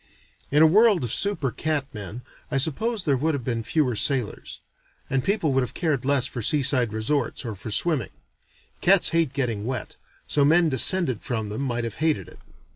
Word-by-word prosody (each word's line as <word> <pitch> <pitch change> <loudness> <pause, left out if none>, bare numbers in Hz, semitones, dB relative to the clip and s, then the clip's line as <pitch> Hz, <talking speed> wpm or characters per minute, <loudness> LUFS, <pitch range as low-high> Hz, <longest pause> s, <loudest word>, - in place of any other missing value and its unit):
In 150 +3 +4
a - - +8
world 205 - +4
of 120 - -2
super 200 -10 0
cat 155 -1 -2
men, 105 +3 -8 0.3
I 145 - -1
suppose 200 - 0
there 145 -5 +1
would 155 +4 -1
have 135 - -5
been 115 -1 -2
fewer 130 0 0
sailors; 125 -1 -2 0.5
and 135 -1 0
people 180 -7 0
would 135 - +2
have 125 - -5
cared 150 -8 -1
less 140 -2 +2
for 120 - -5
seaside 130 -2 +3
resorts, 115 +4 -2
or 115 - -4
for 100 +3 -9
swimming. 140 - 0 0.7
Cats 195 0 +5
hate 165 -5 0
getting 120 -7 -2
wet, 125 0 -5 0.3
so 145 - +1
men 165 +3 +4
descended 140 - +3
from 110 -4 -4
them 105 +5 -5
might 120 -3 -2
have 115 -2 -6
hated 155 - -1
it. - - -17
135 Hz, 190 wpm, -24 LUFS, 120-160 Hz, 0.7 s, a